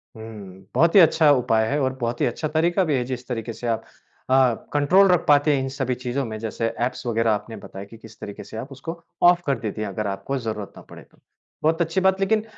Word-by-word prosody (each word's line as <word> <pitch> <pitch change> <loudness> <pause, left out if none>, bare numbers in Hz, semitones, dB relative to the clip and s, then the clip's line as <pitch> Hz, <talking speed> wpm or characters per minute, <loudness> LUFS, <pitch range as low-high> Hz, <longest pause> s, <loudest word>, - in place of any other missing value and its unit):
हुँ। 100 -4 -10
बहुत 165 +4 +3
ही - - +10
अच्छा 160 -2 +5
उपाय 115 -4 +2
है 145 +4 0
और 130 0 0
बहुत 120 0 -2
ही - - +4
अच्छा 125 +6 -2
तरीका 170 +4 +1
भी 155 -5 0
है। 125 - 0
जिस 125 -1 -6
तरीके 115 -2 -4
से 120 - -6
आप 115 -1 -1 0.5
अ, 130 -2 +4 0.2
कंट्रोल 180 +7 +5
रख 180 -2 +3
पाते 145 +1 +5
हैं - - 0
इन 135 - -3
सभी 130 -2 -2
चीज़ों 125 +2 -3
में। 110 -1 -5
जैसे 115 +1 -3 0.2
एप्स 125 0 -5
वगैरह 115 -1 +1
आपने 110 +2 -3
बताया 95 +1 -9
कि 115 +3 -14
किस 110 0 -15
तरीके 100 - -8
से 110 - -10
आप 130 +5 -7
उसको 165 +5 -7 0.2
ऑफ़ 175 0 +6
कर 135 -4 +1
देती 110 -1 -4
हैं 105 - -2
अगर 105 +2 -3
आपको 100 +8 -3
ज़रूरत 110 -4 -5
ना - - -10
पड़े - - -12
तो। - - -28 0.5
बहुत 160 +2 +2
अच्छी 170 +3 0
बात 190 0 +3
लेकिन 215 +2 +1
130 Hz, 245 wpm, -23 LUFS, 110-155 Hz, 0.5 s, ही